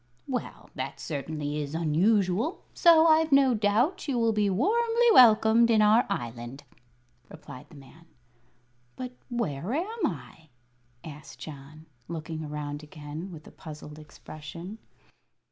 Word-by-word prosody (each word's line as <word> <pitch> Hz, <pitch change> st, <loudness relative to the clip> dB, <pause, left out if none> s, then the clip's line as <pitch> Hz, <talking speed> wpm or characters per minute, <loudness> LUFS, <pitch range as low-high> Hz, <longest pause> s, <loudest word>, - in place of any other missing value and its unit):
"Well, 255 Hz, -2 st, -5 dB
that -, -, -6 dB
certainly 150 Hz, 0 st, -4 dB
is 145 Hz, +1 st, -5 dB
unusual, 190 Hz, -, +1 dB
so 330 Hz, -2 st, +6 dB
I've 320 Hz, -1 st, +4 dB
no 275 Hz, -2 st, +5 dB
doubt 225 Hz, -, +1 dB
you 270 Hz, -4 st, -1 dB
will 230 Hz, -1 st, +2 dB
be 210 Hz, -1 st, +1 dB
warmly 460 Hz, -, +2 dB
welcomed 230 Hz, -, +6 dB
in 225 Hz, -2 st, +4 dB
our 215 Hz, +3 st, +4 dB
Island," 120 Hz, +3 st, -5 dB, 0.7 s
replied 140 Hz, -4 st, -12 dB
the -, -, -16 dB
man. 145 Hz, +4 st, -16 dB, 0.9 s
"But 255 Hz, -1 st, -6 dB, 0.2 s
where 215 Hz, -, -3 dB
am 385 Hz, +3 st, -1 dB
I?" 160 Hz, 0 st, -9 dB, 0.5 s
asked 150 Hz, -2 st, -11 dB
John, 155 Hz, +1 st, -11 dB, 0.2 s
looking 160 Hz, -1 st, -6 dB
around 150 Hz, -1 st, -5 dB
again 150 Hz, +4 st, -8 dB
with 160 Hz, -2 st, -11 dB
a -, -, -13 dB
puzzled 150 Hz, -1 st, -11 dB
expression. 155 Hz, +6 st, -10 dB
170 Hz, 130 wpm, -27 LUFS, 150-240 Hz, 0.9 s, so